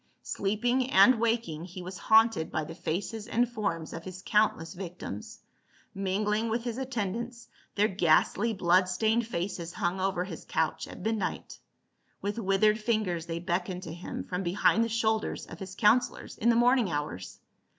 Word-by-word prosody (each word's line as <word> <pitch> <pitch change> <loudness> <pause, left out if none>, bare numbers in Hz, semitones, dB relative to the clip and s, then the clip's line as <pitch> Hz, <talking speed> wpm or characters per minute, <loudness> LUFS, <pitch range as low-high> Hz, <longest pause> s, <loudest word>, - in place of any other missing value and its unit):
Sleeping 240 +6 0
and 220 +2 +6
waking, 225 -9 0
he 180 0 -8
was 185 +1 -7
haunted 220 -6 +4
by 155 - -1
the 160 +2 -7
faces 205 +7 -4
and 240 +1 +2
forms 205 -9 -3
of 165 - -6
his 185 0 -8
countless 210 -6 +2
victims; 175 - -7 0.5
mingling 210 +3 0
with 230 +1 -1
his 240 0 -3
attendants, 235 -1 -4 0.3
their 210 +1 +4
ghastly 190 +4 +2
blood 185 -2 +3
.staincd 220 +5 +1
faces 175 -4 -4
hung 180 +2 -1
over 190 -2 0
his 180 -3 -8
couch 160 -1 -1
at - - -10
midnight; 220 -1 -3 0.6
with 205 +3 -3
withered 210 +1 +3
fingers 210 -7 -1
they 165 0 -3
beckoned 180 +1 -2
to 160 - -6
him 175 +1 -6
from 180 0 -3
behind 195 +5 +3
the 230 - -1
shoulders 220 -1 0
of - - -11
his 190 -1 -7
counselors 235 +5 +2
in 235 - +1
tlie 230 - +4
morning 245 -3 +4
hours. 145 -12 -4
195 Hz, 160 wpm, -29 LUFS, 175-225 Hz, 0.6 s, and